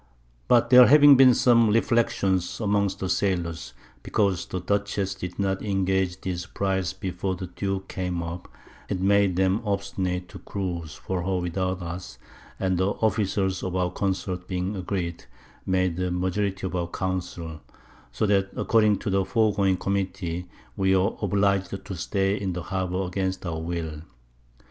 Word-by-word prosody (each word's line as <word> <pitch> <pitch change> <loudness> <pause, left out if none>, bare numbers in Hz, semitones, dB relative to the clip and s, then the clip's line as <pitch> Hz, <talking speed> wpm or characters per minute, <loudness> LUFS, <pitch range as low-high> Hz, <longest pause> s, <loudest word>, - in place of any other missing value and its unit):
But 120 0 +4
there 125 -1 +10
having 145 0 +8
been 130 -2 +7
some 115 -3 +5
Reflections 105 -5 +1
amongst 100 -2 +1
the 95 - -1
Sailors 85 -8 -1 0.3
because 100 - 0
the 90 - -3
Dutchess 100 +1 -1
did 90 0 -7
not 95 -1 0
engage 95 -2 0
this 90 -1 -4
Prize 95 -3 -1
before 95 0 -3
the 90 - -6
Duke 95 +2 -4
came 90 -2 -3
up, 85 +1 -6 0.4
it - - -1
made 100 -1 +3
them 95 +3 +2
obstinate 100 -3 -2
to - - -10
cruize 85 -5 -5
for 95 -1 -3
her 95 +1 -1
without 90 +1 -2
us, 85 -7 -7 0.4
and 95 -2 0
the 95 - +2
Officers 100 -2 0
of 95 -1 -3
our 90 -1 0
Consorts 95 -1 -2
being 90 +2 -2
agreed, 90 -3 -4 0.4
made 95 -2 +1
the 90 0 -1
Majority 95 +2 -1
of 95 - -3
our 85 -1 -1
Council; 85 -4 -4 0.5
so 60 - -1
that 100 -1 +2
according 105 -3 +3
to 100 - -3
the 95 0 +2
foregoing 100 -5 +2
Committee 95 -2 -2 0.3
we 95 0 +3
were 95 +4 +1
obliged 100 -1 0
to 95 - -5
stay 95 +3 0
in 95 -3 -2
the 90 -1 -4
Harbour 95 0 -2
against 95 +1 -3
our 80 -2 -3
Will. 80 -2 -4
95 Hz, 155 wpm, -25 LUFS, 90-100 Hz, 0.5 s, there